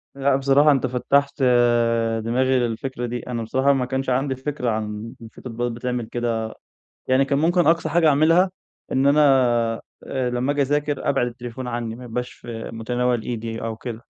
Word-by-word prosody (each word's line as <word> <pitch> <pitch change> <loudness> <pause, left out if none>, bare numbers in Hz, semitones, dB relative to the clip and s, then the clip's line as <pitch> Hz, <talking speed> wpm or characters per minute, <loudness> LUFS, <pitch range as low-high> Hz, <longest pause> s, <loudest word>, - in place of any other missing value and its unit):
لأ، 140 0 +2
بصراحة 140 +2 +4
أنت 135 -2 +1
فتّحت 140 +3 0 0.8
دماغي 130 +3 +2
للفكرة 120 +1 -3
دي. 120 +1 -3
أنا 120 -2 -3
بصراحة 130 +5 +2
ما 130 -2 0
كانش 130 +1 -2
عندي 130 +1 0
فكرة 130 -1 -3
عن 110 0 -4
إن 115 - -9
في 110 - -15
تطبيقات 120 0 -3
بتعمل 120 0 -3
كده. 115 -1 -2 0.5
يعني 130 +1 +3
كان 140 0 0
ممكن 175 +1 +3
أقصى 165 -1 +2
حاجة 165 +1 +3
أعملها 165 +6 +4 0.4
إن 135 +1 +2
أنا، 145 +2 +5 0.8
آآ 130 -2 -2
لما 125 +3 0
أجي 145 0 0
أذاكر 145 +1 0
أبعِد 135 -3 +1
التليفون 120 +1 -7
عني 120 -2 -3
ما 125 - -11
يبقاش 125 +2 -4
في 115 -1 -8
متناول 120 +1 -1
إيدي 115 -1 -5
أو 115 -1 -3
كده. 115 -1 -7
125 Hz, 175 wpm, -22 LUFS, 120-140 Hz, 0.8 s, أنا